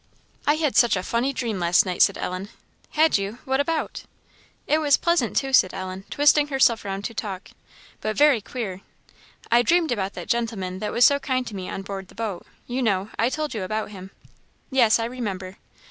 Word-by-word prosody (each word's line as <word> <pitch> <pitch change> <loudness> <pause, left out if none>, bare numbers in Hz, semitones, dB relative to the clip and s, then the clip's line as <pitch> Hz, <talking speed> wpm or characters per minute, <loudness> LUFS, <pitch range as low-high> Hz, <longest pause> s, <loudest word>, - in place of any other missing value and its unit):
"I 295 - +5
had 310 -3 0
such 240 -3 +5
a 185 - -2
funny 240 +6 0
dream 230 -7 -3
last 175 +2 +4
night," 180 -1 -2
said - - +5
Ellen. 185 +2 -4 0.4
"Had 310 -7 +4
you? 200 +4 -4
what 265 +1 0
about?" 315 +2 -1 0.6
"It 305 - +2
was 290 -2 +4
pleasant, 340 0 +1
too," 270 -1 0
said 185 -7 +4
Ellen, 185 +1 -6
twisting 290 0 +4
herself 265 -5 +3
round 195 0 -4
to 230 - -4
talk 195 -3 -6 0.5
"but 215 -1 -3
very 290 -6 +5
queer. 200 -5 -5 0.7
I 235 +1 +6
dreamed 335 +4 +2
about 200 -4 -2
that - - -8
gentleman 215 -6 -2
that 210 - -3
was 240 - +5
so 280 0 +5
kind 260 -2 -1
to 215 - -7
me 185 -1 -5
on 195 - -5
board 195 -1 -6
the - - -18
boat 215 -6 -5 0.2
you 250 +2 -3
know? 205 -3 0
I 230 - +3
told 305 0 -3
you 220 - -3
about 215 +3 -3
him?" 190 -2 -9 0.6
"Yes, 240 -5 +4
I 230 - -2
remember." 195 -6 -5
230 Hz, 200 wpm, -24 LUFS, 195-270 Hz, 0.7 s, I